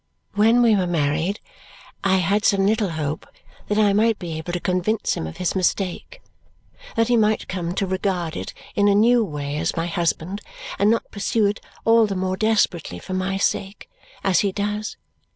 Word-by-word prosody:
"When 225 Hz, +4 st, +4 dB
we 225 Hz, -2 st, +5 dB
were 185 Hz, -3 st, +1 dB
married 165 Hz, +4 st, 0 dB, 0.6 s
I 195 Hz, -1 st, +3 dB
had 200 Hz, +4 st, +1 dB
some 195 Hz, -1 st, +3 dB
little 215 Hz, -1 st, +2 dB
hope 155 Hz, -2 st, -4 dB, 0.4 s
that 210 Hz, -, 0 dB
I 210 Hz, -2 st, +4 dB
might 220 Hz, +1 st, +3 dB
be 170 Hz, -3 st, -5 dB
able 160 Hz, +2 st, -5 dB
to 175 Hz, -, -2 dB
convince 185 Hz, +5 st, 0 dB
him 80 Hz, -, -4 dB
of 80 Hz, -, -9 dB
his 180 Hz, -, -1 dB
mistake, 190 Hz, -, -2 dB, 0.7 s
that 230 Hz, -1 st, +2 dB
he 245 Hz, -, +3 dB
might 215 Hz, -1 st, +2 dB
come 175 Hz, -1 st, -3 dB
to 195 Hz, -, 0 dB
regard 185 Hz, -3 st, -2 dB
it -, -, -5 dB, 0.2 s
in 205 Hz, 0 st, +3 dB
a 200 Hz, -, +4 dB
new 235 Hz, +3 st, +5 dB
way 145 Hz, -5 st, -4 dB
as 165 Hz, +2 st, -1 dB
my 165 Hz, -, 0 dB
husband 170 Hz, +3 st, -2 dB, 0.4 s
and 205 Hz, -, +4 dB
not 230 Hz, +1 st, 0 dB
pursue 210 Hz, +2 st, 0 dB
it 205 Hz, +1 st, 0 dB, 0.3 s
all 225 Hz, -1 st, +5 dB
the 195 Hz, -, -3 dB
more 185 Hz, 0 st, -1 dB
desperately 205 Hz, -, +1 dB
for 185 Hz, -, -7 dB
my 185 Hz, +1 st, -1 dB
sake 195 Hz, 0 st, -2 dB, 0.3 s
as 190 Hz, -2 st, +3 dB
he 200 Hz, -2 st, +1 dB
does. 210 Hz, +2 st, -3 dB
195 Hz, 190 wpm, -22 LUFS, 175-210 Hz, 0.7 s, we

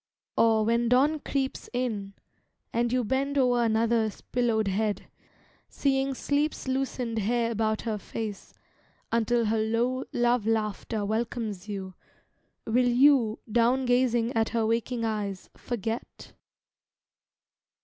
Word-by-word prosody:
or, 220 Hz, -1 st, +4 dB
when 235 Hz, +1 st, +2 dB
dawn 285 Hz, +5 st, +3 dB
creeps 270 Hz, -2 st, -3 dB
in, 215 Hz, -6 st, -2 dB, 0.6 s
And 235 Hz, 0 st, +1 dB
you 250 Hz, 0 st, +1 dB
bend 275 Hz, +5 st, -1 dB
o'er 245 Hz, -3 st, +3 dB
another's 225 Hz, -1 st, +1 dB
pillowed 230 Hz, -4 st, 0 dB
head, 205 Hz, +1 st, -1 dB, 0.6 s
Seeing 270 Hz, -1 st, 0 dB
sleep's 290 Hz, +2 st, -1 dB
loosened 260 Hz, -3 st, -1 dB
hair 230 Hz, +2 st, +1 dB
about 220 Hz, -1 st, 0 dB
her 220 Hz, -3 st, -2 dB
face, 210 Hz, -1 st, -6 dB, 0.6 s
Until 235 Hz, +1 st, +2 dB
her 220 Hz, +1 st, +1 dB
low 235 Hz, +4 st, 0 dB
love 240 Hz, -2 st, +1 dB
laughter 215 Hz, -1 st, -1 dB
welcomes 220 Hz, -2 st, -3 dB
you, 190 Hz, -2 st, -5 dB, 0.7 s
Will 245 Hz, +2 st, +2 dB
you, 245 Hz, -3 st, +4 dB
down 245 Hz, +3 st, +3 dB
gazing 245 Hz, -1 st, +2 dB
at 225 Hz, -1 st, +1 dB
her 230 Hz, -1 st, 0 dB
waking 230 Hz, +1 st, -1 dB
eyes, 205 Hz, -4 st, -3 dB
Forget? 230 Hz, 0 st, -5 dB
230 Hz, 120 wpm, -27 LUFS, 220-250 Hz, 0.7 s, or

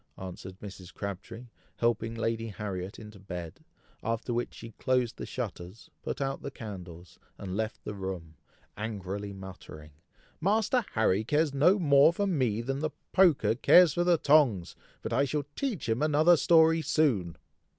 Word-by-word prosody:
answered 95 Hz, 0 st, -9 dB
Mrs. 95 Hz, -3 st, -10 dB
Crabtree, 100 Hz, +5 st, -7 dB, 0.3 s
helping 115 Hz, -1 st, 0 dB
Lady 115 Hz, 0 st, -2 dB
Harriet 100 Hz, -2 st, -5 dB
into 105 Hz, -2 st, -11 dB
bed, 90 Hz, -4 st, -8 dB, 0.4 s
after 115 Hz, +2 st, -2 dB
which 120 Hz, +1 st, -2 dB
she 115 Hz, -, -10 dB
closed 125 Hz, -2 st, 0 dB
the -, -, -6 dB
shutters, 100 Hz, -4 st, -7 dB
put -, -, -4 dB
out 135 Hz, 0 st, -2 dB
the -, -, -5 dB
candles, 90 Hz, -8 st, -10 dB, 0.2 s
and 95 Hz, -2 st, -6 dB
left 110 Hz, +1 st, -3 dB
the -, -, -5 dB
room, 95 Hz, -5 st, -6 dB, 0.4 s
angrily 100 Hz, -2 st, -5 dB
muttering, 95 Hz, -6 st, -11 dB, 0.5 s
"Master 220 Hz, +7 st, +2 dB
Harry 110 Hz, -2 st, +2 dB
cares 150 Hz, +4 st, +1 dB
no 160 Hz, +9 st, +4 dB
more 145 Hz, -4 st, +5 dB
for 200 Hz, +4 st, -1 dB
me 130 Hz, -, 0 dB
than 135 Hz, +3 st, -3 dB
the 155 Hz, +1 st, -1 dB, 0.2 s
poker 175 Hz, -11 st, +4 dB
cares 165 Hz, +7 st, +6 dB
for 175 Hz, -, +1 dB
the 175 Hz, -1 st, +4 dB
tongs, 140 Hz, -, +3 dB, 0.3 s
but -, -, -3 dB
I 140 Hz, -, +3 dB
shall 145 Hz, 0 st, -2 dB
teach 235 Hz, -, -3 dB
him 115 Hz, +3 st, 0 dB
another 155 Hz, +3 st, +5 dB
story 165 Hz, 0 st, +4 dB
soon." 105 Hz, -, +1 dB
115 Hz, 155 wpm, -29 LUFS, 95-150 Hz, 0.5 s, cares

